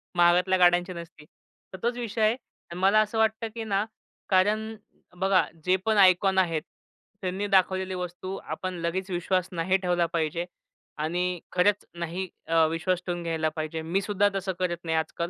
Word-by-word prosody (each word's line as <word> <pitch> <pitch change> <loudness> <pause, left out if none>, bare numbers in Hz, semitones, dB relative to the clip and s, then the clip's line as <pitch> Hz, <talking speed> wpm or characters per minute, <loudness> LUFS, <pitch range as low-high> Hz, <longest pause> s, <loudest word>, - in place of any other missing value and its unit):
महागातल्या 180 +2 +4
गाड्यांची 175 +1 +4
नसती. 170 -2 -10 0.5
तर - - -6
तोच 240 +1 0
विषय 230 -2 -3
आहे. 215 +2 +4 0.4
मला 195 +4 +4
असं 215 +1 -2
वाटतं, 220 +1 +1
की 225 - -4
ना 205 -1 0 0.4
कारण 215 +4 +2 0.5
बघा, 190 -1 +4 0.2
जे 185 - +4
पण 220 -1 +2
आयकॉन 190 0 +5
आहेत 165 -4 +2 0.6
त्यांनी 190 +2 -2
दाखवलेली 190 -1 +2
वस्तू 180 +1 -5
आपण 185 0 -4
लगेच 185 +3 -2
विश्वास 180 +1 0
नाही 180 +2 +1
ठेवला 175 -2 +1
पाहिजे 165 +1 -1 0.5
आणि 175 +3 -1
खरंच 205 +3 +2
नाही 175 +3 -3 0.2
अ, 165 -1 +4
विश्वास 170 +2 -1
ठेवून 175 -1 -2
घ्यायला 160 -1 0
पाहिजे. 160 +1 -3
मीसुद्धा 195 +4 +1
तसं 190 0 -2
करत 175 -2 0
नाही 160 -1 0
आजकाल. 165 +2 -2
185 Hz, 155 wpm, -27 LUFS, 170-195 Hz, 0.6 s, आयकॉन